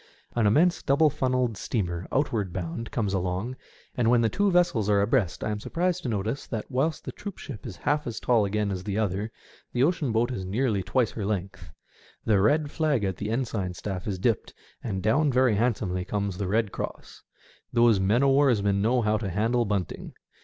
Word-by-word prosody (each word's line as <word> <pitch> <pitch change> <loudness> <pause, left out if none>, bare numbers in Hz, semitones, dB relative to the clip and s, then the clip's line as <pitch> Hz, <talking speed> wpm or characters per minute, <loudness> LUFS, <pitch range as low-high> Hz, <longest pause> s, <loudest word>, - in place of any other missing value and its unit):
An 115 -3 +3
immense 170 - +3
double 145 +2 +3
funnelled 125 -5 0
steamer 90 -6 -2
outward 115 -9 0
bound 90 +6 -4
comes 105 -5 -1
along, 95 +6 -2 0.4
and 120 -3 +2
when 120 -1 +4
the 115 - +2
two 205 - +1
vessels 175 - +2
are 100 -1 +4
abreast 105 -2 +1
I 110 - -1
am 105 - -3
surprised 175 - -1
to 125 - -3
notice 110 +5 -2
that 115 +2 -5
whilst 145 +5 0
the - - -4
troopship 190 - -8
is 95 - -7
half 150 -1 +1
as 120 - -4
tall 120 -4 +3
again 100 0 0
as 95 -1 -4
the 100 0 -3
other, 105 +1 -1 0.4
the 125 - +2
ocean 150 -4 +1
boat 115 +3 +1
is 100 -7 -4
nearly 105 +2 0
twice 120 +5 +1
her 110 - -5
length. 100 -1 -4 0.6
The 105 -3 +3
red 145 +7 +2
flag 150 -8 +1
at 95 -2 -1
the 105 - -4
ensign 110 -6 -2
staff 95 +1 -5
is 100 -3 -2
dipped, 110 +4 -1 0.3
and 95 -5 -3
down 140 +7 +3
very 130 -2 +3
handsomely 105 -5 0
comes 100 -1 -3
the 100 - -1
red 105 +1 +1
cross. - - -7 0.5
Those 115 -4 +4
men 105 +7 +2
o' 140 - +5
warsmen 110 -8 +3
know 120 +3 +2
how 105 0 +2
to 105 -3 -3
handle 115 +6 +1
bunting. 100 -5 -3
110 Hz, 195 wpm, -27 LUFS, 100-130 Hz, 0.6 s, o